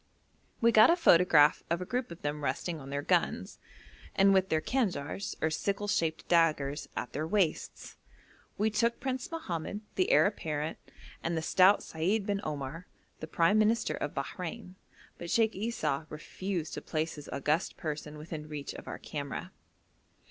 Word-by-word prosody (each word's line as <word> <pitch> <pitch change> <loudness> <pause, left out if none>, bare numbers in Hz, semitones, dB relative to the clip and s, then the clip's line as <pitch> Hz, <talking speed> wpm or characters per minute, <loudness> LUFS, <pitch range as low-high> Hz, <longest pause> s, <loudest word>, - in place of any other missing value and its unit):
We 235 0 +5
got 215 -1 +7
a 335 - +6
photograph 170 - +5
of 170 +1 +1
a 180 - -4
group 250 +5 -2
of 170 0 -11
them 145 0 -3
resting 155 +5 -2
on 135 - -9
their 140 +1 -3
guns, - - 0 0.6
and 195 0 +5
with 190 0 +3
their 160 - +2
kanjars 190 - -2
or 160 - +2
sickle 200 +5 -1
shaped 165 -6 0
daggers 150 -4 +2
at - - -4
their 155 +3 -2
waists. 180 -4 -1 0.6
We 215 +1 +1
took 230 +2 +1
Prince 260 -1 -3
Mohamed, 200 - -4
the 185 - +1
heir - - +6
apparent, 155 -6 -2 0.4
and 165 0 -1
the 160 - -2
stout 185 +4 +5
Seid 190 +6 -1
bin 200 -1 -1
Omar, 150 +3 -5 0.3
the 155 - -6
prime 170 +6 +3
minister 215 +1 +2
of 145 - -4
Bahrein. 180 +7 -5 0.5
But 170 - -6
Sheikh 225 +1 +3
Esau 160 -9 -2
refused 170 +2 -4
to - - -5
place 160 0 -2
his 150 -1 -10
august 150 +6 -1
person 150 -1 -5
within 155 0 -7
reach 145 -2 -5
of - - -10
our - - -5
camera. 140 -2 -6
170 Hz, 165 wpm, -30 LUFS, 150-205 Hz, 0.6 s, got